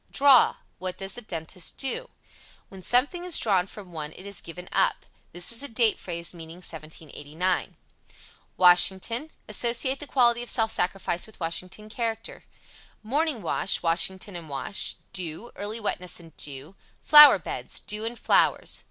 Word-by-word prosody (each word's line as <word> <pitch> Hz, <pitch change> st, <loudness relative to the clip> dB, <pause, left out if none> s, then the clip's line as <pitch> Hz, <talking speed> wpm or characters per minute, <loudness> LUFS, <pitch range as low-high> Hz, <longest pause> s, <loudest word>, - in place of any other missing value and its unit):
Draw 275 Hz, -3 st, +5 dB, 0.2 s
What 185 Hz, 0 st, -4 dB
does 195 Hz, 0 st, -3 dB
a -, -, -8 dB
dentist 175 Hz, -3 st, -6 dB
do? 270 Hz, -, -3 dB
(To -, -, 0 dB
give -, -, -5 dB
up) -, -, -24 dB, 0.6 s
When 190 Hz, -1 st, -12 dB
something 255 Hz, -, +1 dB
is 360 Hz, -2 st, +1 dB
drawn 195 Hz, -5 st, +1 dB
from 195 Hz, -3 st, -11 dB
one 155 Hz, -2 st, -6 dB
it 185 Hz, -, -12 dB
is 200 Hz, -2 st, -6 dB
given 180 Hz, +2 st, -10 dB
up. -, -, +1 dB, 0.3 s
This 175 Hz, +4 st, -2 dB
is 230 Hz, -, -3 dB
a 285 Hz, -, -3 dB
date 225 Hz, -3 st, +2 dB
phrase 170 Hz, -1 st, -5 dB
meaning 165 Hz, -1 st, -10 dB
1789. 160 Hz, +1 st, -4 dB, 0.8 s
WASHINGTON. 190 Hz, -, +4 dB, 0.2 s
Associate 240 Hz, +5 st, 0 dB
the 295 Hz, -, -8 dB
quality 240 Hz, -3 st, +3 dB
of 240 Hz, -, -6 dB
self 225 Hz, -3 st, +1 dB
sacrifice 180 Hz, -1 st, 0 dB
with 220 Hz, -, -16 dB
Washington's 185 Hz, +5 st, -5 dB
character. 225 Hz, -2 st, -4 dB, 0.6 s
Morning 280 Hz, -, 0 dB
wash 175 Hz, +3 st, 0 dB
Washington 185 Hz, +3 st, 0 dB
and 165 Hz, -3 st, -8 dB
wash. 140 Hz, +8 st, -2 dB, 0.2 s
Dew 185 Hz, +4 st, -4 dB
Early 210 Hz, +3 st, -4 dB
wetness 180 Hz, -5 st, -3 dB
and 165 Hz, -2 st, -15 dB
dew. 145 Hz, +5 st, -7 dB, 0.3 s
Flower 300 Hz, -1 st, +10 dB
beds -, -, -5 dB
Dew 210 Hz, +1 st, -4 dB
and 230 Hz, +1 st, -4 dB
flowers. -, -, +3 dB
195 Hz, 160 wpm, -26 LUFS, 175-235 Hz, 0.8 s, Flower